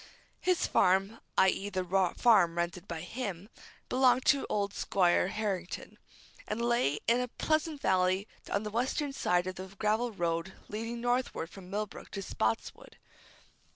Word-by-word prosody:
His 365 -1 +2
farm 195 +4 +2 0.2
i.e., 190 +1 +3
the 185 -2 -2 0.3
farm 190 -8 +5
rented 170 0 -2
by 165 -2 -5
him 200 -1 -5 0.4
belonged 255 -1 +3
to 280 -2 +3
old 200 -1 0
Squire 180 -2 +2
Harrington, 195 -3 -4 0.5
and 210 - -2
lay 235 - +2
in 235 +2 +4
a 250 - -1
pleasant 310 +3 -1
valley 185 +2 +2 0.2
on 200 - 0
the 210 - -4
western 265 +5 -1
side 180 -8 +1
of 185 0 -5
the 185 +1 -6
gravel 220 +4 +1
road 170 -1 -2 0.2
leading 230 +3 -4
northward 245 -9 -1
from 185 -2 -11
Millbrook 210 +1 -4
to 195 -1 -4
Spotswood. 110 -9 -3
200 Hz, 145 wpm, -31 LUFS, 180-240 Hz, 0.5 s, farm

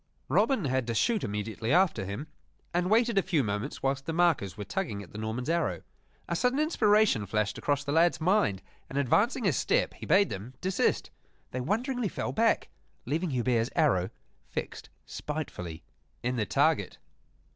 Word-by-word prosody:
Robin 205 - +2
had 130 -2 0
to 115 - -1
shoot 225 - +2
immediately 110 +2 -3
after 175 - +3
him, 100 +10 -5 0.5
and 180 +1 +1
waited 230 -1 +4
a - - +3
few 160 -7 +1
moments 105 +5 -3
whilst 135 +1 -1
the - - 0
markers 160 - +2
were 105 - -4
tugging 100 +1 -3
at 90 - -15
the - - -9
Norman's 110 +3 -3
arrow. 170 +1 0 0.4
A - - -1
sudden 250 +1 +1
inspiration 215 - +3
flashed 105 +1 -1
across 145 -1 0
the 140 - -3
lad's 170 +2 +3
mind; 175 - +2 0.3
and, 135 - -5
advancing 205 - +2
a 170 - +3
step, - - +1
he - - -9
bade 200 +1 +4
them 105 +7 -6
desist. 190 0 0 0.4
They 130 - -3
wonderingly 235 - -1
fell - - -3
back, 225 0 +2 0.4
leaving 160 +7 -1
Hubert's 120 -3 +1
arrow 120 - +3 0.4
fixed - - -5 0.2
spitefully 90 - -5 0.4
in 125 +1 0
the 110 -4 -1
target. - - +1
145 Hz, 165 wpm, -29 LUFS, -, 0.5 s, waited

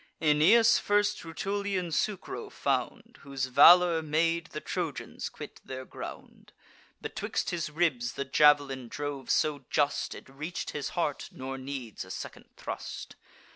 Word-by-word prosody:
Aeneas 175 +10 +5
first 205 0 +1
Rutulian 190 +2 -2
Sucro 190 +6 -2
found, - - -2
Whose 135 -1 -3
valour 165 +6 +7
made 165 +2 0
the 155 - -6
Trojans 175 -4 -4
quit - - -10
their 130 0 -7
ground; - - -10 0.5
Betwixt - - -3
his 165 -3 -2
ribs 150 -7 0
the 140 - -3
jav'lin 140 -2 +4
drove 145 -1 -5
so 145 -3 +1
just, 145 -1 0
It - - -11
reach'd 150 +6 -5
his 145 -2 -3
heart, 150 -4 -1
nor 135 0 -6
needs 130 -4 -6
a 95 - -14
second - - -8
thrust. - - -6
150 Hz, 135 wpm, -29 LUFS, 135-175 Hz, 0.5 s, valour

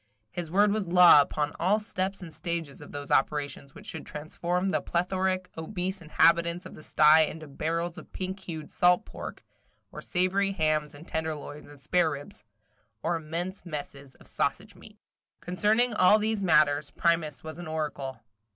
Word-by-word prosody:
His 175 -2 -5
word 200 +4 +4
was 210 -3 -1
law 175 -3 +8
upon 145 +1 -1
all 190 +5 +3
steps 195 -3 -3
and 165 -3 -9
stages 165 -4 -4
of 145 - -11
those 145 0 -7
operations 140 0 0
which - - -12
should - - -6
transform 175 +5 -2
the - - 0
plethoric, 185 +1 -1
obese 185 +3 -4
inhabitants 170 +2 +3
of - - -9
the - - -12
sty 155 +1 +5
into 155 0 -8
barrels 165 +4 -3
of - - -15
pink 190 +1 -5
hued 160 -5 -7
salt 180 0 +3
pork - - -8 0.5
or - - -8
savory 195 +2 0
hams 155 -4 0
and 150 +4 -13
tenderloins 155 -2 -5
and 145 -1 -14
spareribs, 160 - -1 0.6
or 170 +2 +1
immense 170 +4 -4
messes 140 -4 -7
of - - -19
sausage - - -2
meat. - - -16 0.4
Concerning 215 +7 +1
all 210 0 +6
these 215 -1 -1
matters, 150 -4 +3
Primus 165 -4 0
was 160 +1 -8
an 175 - -7
oracle. 145 -5 -4
170 Hz, 160 wpm, -28 LUFS, 150-185 Hz, 0.6 s, law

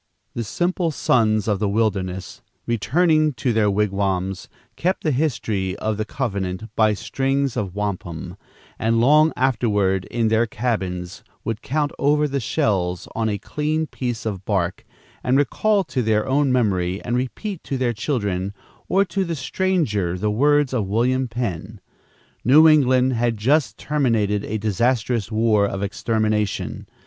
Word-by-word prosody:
The 120 - -3
simple 175 - -1
sons 110 -8 +2
of 105 -3 +1
the 105 -1 0
wilderness, 95 -4 -2 0.2
returning 155 - +2
to 120 0 -1
their 110 -2 +3
wigwams, 95 -2 -1 0.3
kept 185 +3 -1
the 155 - +1
history 110 -9 -1
of 110 0 -2
the 110 - -2
covenant 100 -4 -4
by 110 -1 +3
strings 135 +5 -1
of 95 -3 -3
wampum, 95 -5 -4 0.4
and, 115 +1 +2
long 150 +6 +5
afterward, 105 -7 +1
in 115 -2 0
their 110 +1 +2
cabins, 95 -7 -3 0.2
would 110 -2 -3
count 145 +1 -1
over 150 +1 +3
the 140 -1 -2
shells 90 -6 -1
on 110 -1 0
a 100 - -1
clean 150 +8 -2
piece 120 -6 -4
of 100 -4 -3
bark 95 -3 -1 0.4
and 125 +2 +2
recall 200 - +2
to 135 -7 -2
their 110 0 +1
own 135 +1 +2
memory 95 -7 +1
and 120 - -1
repeat 160 - -3
to 135 - -2
their 125 -2 0
children 100 -5 -2 0.3
or 195 +1 +3
to 195 +1 -1
the 170 -2 -3
stranger 135 - 0
the 105 +3 0
words 145 +4 +3
of 110 -6 0
William 125 +5 +1
Penn. 110 -4 -4 0.6
New 150 +6 +7
England 130 -4 +4
had 120 -1 0
just 140 +8 +1
terminated 115 -9 0
a 110 - -2
disastrous 110 +2 0
war 110 -2 +3
of 95 0 -4
extermination. 105 0 -1
115 Hz, 150 wpm, -22 LUFS, 100-135 Hz, 0.6 s, New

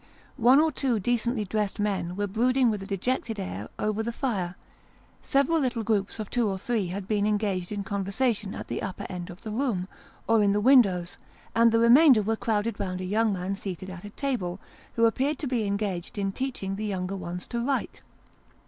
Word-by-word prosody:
One 250 +3 +6
or 315 +1 +3
two 255 -5 0
decently 235 +1 0
dressed 210 0 -2
men 195 -4 -1
were 205 +1 -1
brooding 245 +4 +2
with 210 -2 -3
a 195 - -7
dejected 220 +2 -2
air 105 - -5
over 215 +1 -1
the 230 +1 -2
fire; 195 -8 -2 0.7
several 280 +4 +2
little 250 -5 -1
groups 210 -3 0
of 215 -2 -4
two 235 -2 +1
or 190 - -2
three 215 -1 -1
had 190 +2 -5
been 210 -1 +1
engaged 205 -4 -1
in 205 -1 -3
conversation 200 +2 -1
at - - -7
the - - -3
upper 190 - -5
end 175 -1 -5
of 180 +5 -11
the 215 - -5
room, 215 -6 -1 0.4
or 225 -1 +4
in 200 -1 +3
the 205 - +2
windows; 200 -8 +4 0.3
and 230 0 +5
the 230 - +3
remainder 240 +1 +7
were 225 +2 0
crowded 225 -1 -1
round 185 -2 -3
a 185 - -4
young 215 +3 +2
man 190 0 -2
seated 190 -1 -6
at 185 -1 -9
a 205 - -7
table, 200 -8 -3 0.4
who 230 - +4
appeared 270 +6 +1
to 295 - -5
be 240 -5 0
engaged 200 -2 -3
in 195 -1 0
teaching 195 -5 -3
the 215 - -3
younger 190 -1 -2
ones 180 -1 -6
to 235 -1 -3
write. 270 +1 -2
210 Hz, 200 wpm, -27 LUFS, 195-235 Hz, 0.7 s, remainder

